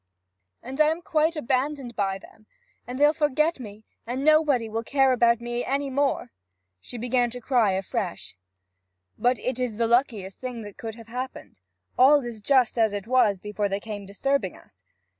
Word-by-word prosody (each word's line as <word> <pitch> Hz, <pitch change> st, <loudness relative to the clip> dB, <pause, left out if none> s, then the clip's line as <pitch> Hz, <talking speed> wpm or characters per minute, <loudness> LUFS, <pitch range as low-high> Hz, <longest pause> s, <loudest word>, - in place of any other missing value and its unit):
'And 265 Hz, +5 st, -2 dB
I 305 Hz, -, +6 dB
am 325 Hz, +2 st, -1 dB
quite 320 Hz, +1 st, +1 dB
abandoned 265 Hz, -2 st, -2 dB
by 195 Hz, -2 st, 0 dB
them! 215 Hz, +2 st, -18 dB, 0.4 s
and 250 Hz, +1 st, -5 dB
they'll 295 Hz, +1 st, +5 dB
forget 305 Hz, +1 st, +1 dB
me, 215 Hz, -2 st, -10 dB, 0.2 s
and 255 Hz, +4 st, -3 dB
nobody 305 Hz, -6 st, +4 dB, 0.2 s
care 270 Hz, +1 st, +3 dB
about 235 Hz, -1 st, +3 dB
me 240 Hz, 0 st, -3 dB
any 275 Hz, +1 st, -1 dB
more!' 275 Hz, -2 st, 0 dB, 0.5 s
She 245 Hz, -, -9 dB
began 245 Hz, +1 st, +1 dB
to 245 Hz, +1 st, -7 dB
cry 235 Hz, -5 st, +2 dB
afresh. 190 Hz, 0 st, -4 dB, 0.8 s
'But 245 Hz, +1 st, +2 dB
it 255 Hz, 0 st, -3 dB
is 245 Hz, -4 st, -2 dB
the 230 Hz, -, +2 dB
luckiest 225 Hz, -5 st, 0 dB
thing 250 Hz, -3 st, -5 dB
that 205 Hz, -1 st, -11 dB
could 225 Hz, -1 st, -6 dB
have 230 Hz, -1 st, -13 dB
happened. 250 Hz, -, -7 dB, 0.4 s
All 275 Hz, +1 st, +6 dB
is 230 Hz, -3 st, -7 dB
just 250 Hz, -1 st, +2 dB
as 220 Hz, -2 st, +3 dB
it 205 Hz, -1 st, -4 dB
was 225 Hz, -5 st, +3 dB
before 210 Hz, +1 st, -2 dB
they 195 Hz, +1 st, -1 dB
came 205 Hz, -2 st, -7 dB
disturbing 205 Hz, 0 st, -1 dB
us. 95 Hz, -, -21 dB
245 Hz, 175 wpm, -25 LUFS, 215-275 Hz, 0.8 s, I